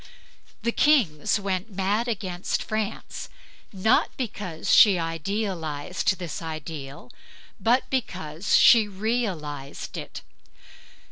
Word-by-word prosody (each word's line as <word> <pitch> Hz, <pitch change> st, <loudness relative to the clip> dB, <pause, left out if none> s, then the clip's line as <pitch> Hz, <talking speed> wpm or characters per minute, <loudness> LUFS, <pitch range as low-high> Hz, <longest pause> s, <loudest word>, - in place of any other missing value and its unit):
The 235 Hz, -, +1 dB
kings 220 Hz, -, +3 dB
went 195 Hz, +1 st, -2 dB
mad 205 Hz, +5 st, 0 dB
against 190 Hz, -5 st, -2 dB
France 215 Hz, -2 st, -4 dB, 0.4 s
not 210 Hz, +4 st, +3 dB
because 200 Hz, -9 st, -2 dB
she 200 Hz, -4 st, +8 dB
idealized 165 Hz, -1 st, -2 dB
this 175 Hz, -3 st, -5 dB
ideal, 150 Hz, -5 st, -7 dB, 0.5 s
but 235 Hz, +6 st, +2 dB
because 180 Hz, -, -1 dB
she 225 Hz, -3 st, +7 dB
realized 190 Hz, -, -3 dB
it. -, -, -7 dB
190 Hz, 90 wpm, -25 LUFS, 160-220 Hz, 0.5 s, she